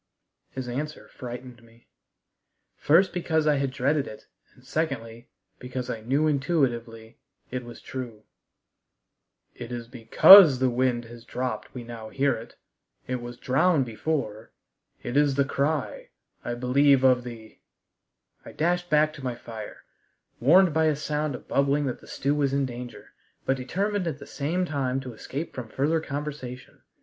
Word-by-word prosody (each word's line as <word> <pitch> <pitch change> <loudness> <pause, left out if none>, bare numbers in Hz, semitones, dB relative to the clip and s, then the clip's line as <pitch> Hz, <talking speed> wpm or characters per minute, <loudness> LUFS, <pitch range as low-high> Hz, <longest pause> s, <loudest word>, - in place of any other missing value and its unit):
His 130 -1 -6
answer 150 +5 -5
frightened 125 -1 -9
me, 115 0 -22 0.9
first 175 +6 +3
because 160 -3 0
I 150 -2 +3
had 135 0 0
dreaded 135 +2 0
it, 110 - -10 0.3
and 125 - -21
secondly, 120 -6 -3 0.3
because 125 0 -5
I 110 - -5
knew 135 +7 +1
intuitively 125 -7 -1 0.3
it 125 0 -3
was 120 -1 -11
true. 120 -5 -7 1.3
"It 120 0 -9
is 120 -1 -5
because 130 - +8
the 130 0 +1
wind 120 -1 0
has 115 0 -12
dropped 125 +1 -4
we 125 - -6
now 115 -2 -8
hear 140 +4 +1
it. 115 0 -9 0.5
It 125 -1 -3
was 120 0 -8
drowned 140 +3 +2
before. 115 -2 -3 0.5
It 120 - -4
is 145 -2 +3
the 140 0 +2
cry, 145 +2 -2 0.3
I 120 - -3
believe 135 +2 +3
of 125 -2 +4
the 115 -3 -10 0.4
" - - -48
I - - -11
dashed 175 +2 0
back 155 0 +3
to 140 - -11
my 125 -2 -2
fire, 115 -3 -9 0.6
warned 170 +7 +5
by 160 +1 +2
a 155 -1 +2
sound 150 0 -2
of - - -11
bubbling 140 +1 +1
that 130 - -3
the - - -16
stew 140 +1 -1
was 140 -2 0
in 140 0 +1
danger, 120 -1 -9 0.3
but 135 - +2
determined 190 +9 -2
at 155 -4 -3
the 140 - -11
same 165 +6 -2
time 135 -5 -1
to 130 -2 -8
escape 140 +8 -6
from 120 -4 -7
further 150 +7 +1
conversation. 140 -4 -7
130 Hz, 160 wpm, -26 LUFS, 120-150 Hz, 1.3 s, because